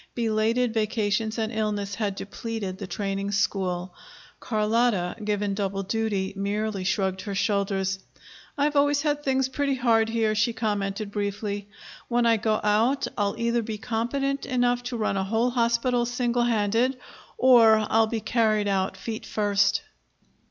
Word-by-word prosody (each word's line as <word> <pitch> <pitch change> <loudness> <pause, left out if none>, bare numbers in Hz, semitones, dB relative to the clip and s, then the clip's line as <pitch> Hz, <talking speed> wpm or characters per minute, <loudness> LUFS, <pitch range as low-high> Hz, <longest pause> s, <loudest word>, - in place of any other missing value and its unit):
Belated 225 +1 +1
vacations 220 0 0
and 220 -1 -1
illness 210 -2 -2
had 205 -2 -2
depleted 200 -2 -5
the 195 - -5
training 195 0 -3
school. 185 -3 -1 0.5
Carlotta, 215 -4 +1
given 205 -1 -1
double 195 -1 -2
duty, 205 -2 -1
merely 200 0 -2
shrugged 190 0 0
her 200 -1 -5
shoulders. 195 -1 0 0.6
"I've 295 +1 +1
always 285 0 +3
had 295 -1 0
things 265 -2 +1
pretty 275 +1 -1
hard 230 -3 +2
here," 225 -1 +1
she 215 +2 +1
commented 205 -2 -2
briefly. 205 0 -3 0.4
"When 240 0 +1
I 230 -1 +4
go 215 0 0
out, 220 +6 +2
I'll 200 -1 0
either 235 0 +1
be 220 -1 -5
competent 250 +6 -2
enough 245 -2 +1
to 245 -1 -3
run 215 -3 0
a 190 - 0
whole 225 +5 +1
hospital 240 0 +1
singlehanded, 240 0 +1 0.4
or 225 -4 +6
I'll 225 0 +3
be 225 0 -3
carried 215 -2 +1
out 190 -1 0
feet 220 +2 -5
first." 205 -1 +1
220 Hz, 145 wpm, -26 LUFS, 200-235 Hz, 0.6 s, or